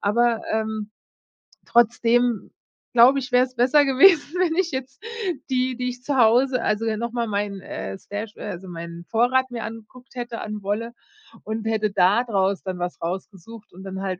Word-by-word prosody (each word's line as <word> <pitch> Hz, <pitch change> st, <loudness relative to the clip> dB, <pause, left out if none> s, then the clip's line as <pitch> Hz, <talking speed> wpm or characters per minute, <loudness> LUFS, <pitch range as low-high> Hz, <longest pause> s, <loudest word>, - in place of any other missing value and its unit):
Aber, 230 Hz, +2 st, +2 dB
ähm, 220 Hz, -1 st, -2 dB, 0.8 s
trotzdem, 235 Hz, -1 st, +2 dB, 0.4 s
glaube 250 Hz, +3 st, +6 dB
ich, 260 Hz, -1 st, -7 dB
wäre 250 Hz, +1 st, +5 dB
es 255 Hz, -, -17 dB
besser 260 Hz, +5 st, +4 dB
gewesen, 295 Hz, +4 st, +5 dB
wenn 340 Hz, -3 st, +2 dB
ich 365 Hz, -1 st, +1 dB
jetzt 260 Hz, -, -6 dB, 0.5 s
die, 255 Hz, -1 st, 0 dB
die 250 Hz, 0 st, -2 dB
ich 250 Hz, 0 st, -9 dB
zu 285 Hz, -2 st, -1 dB
Hause 250 Hz, +2 st, +4 dB
also, 215 Hz, +1 st, 0 dB
ja, 220 Hz, -1 st, -1 dB
noch 235 Hz, +1 st, -3 dB
mal 235 Hz, -1 st, -1 dB
meinen, 200 Hz, -2 st, -2 dB
äh, 195 Hz, -, -6 dB
Stash 210 Hz, +2 st, -7 dB
äh, -, -, -8 dB
also 185 Hz, +2 st, -7 dB
meinen 170 Hz, 0 st, -8 dB
Vorrat 255 Hz, +5 st, +2 dB
mir 235 Hz, -2 st, -5 dB
angeguckt 225 Hz, +4 st, -10 dB
hätte, 240 Hz, -2 st, -5 dB
an 210 Hz, -1 st, -5 dB
Wolle 220 Hz, +4 st, -2 dB, 0.5 s
und 220 Hz, +1 st, -4 dB
hätte 215 Hz, -2 st, 0 dB
da 195 Hz, +6 st, +3 dB
draus 195 Hz, -4 st, 0 dB
dann 185 Hz, -1 st, -4 dB
was 175 Hz, -1 st, -4 dB
rausgesucht 190 Hz, +5 st, -7 dB
und 190 Hz, -, -11 dB
dann 190 Hz, 0 st, -6 dB
halt 185 Hz, -2 st, -3 dB
230 Hz, 180 wpm, -23 LUFS, 205-250 Hz, 0.8 s, glaube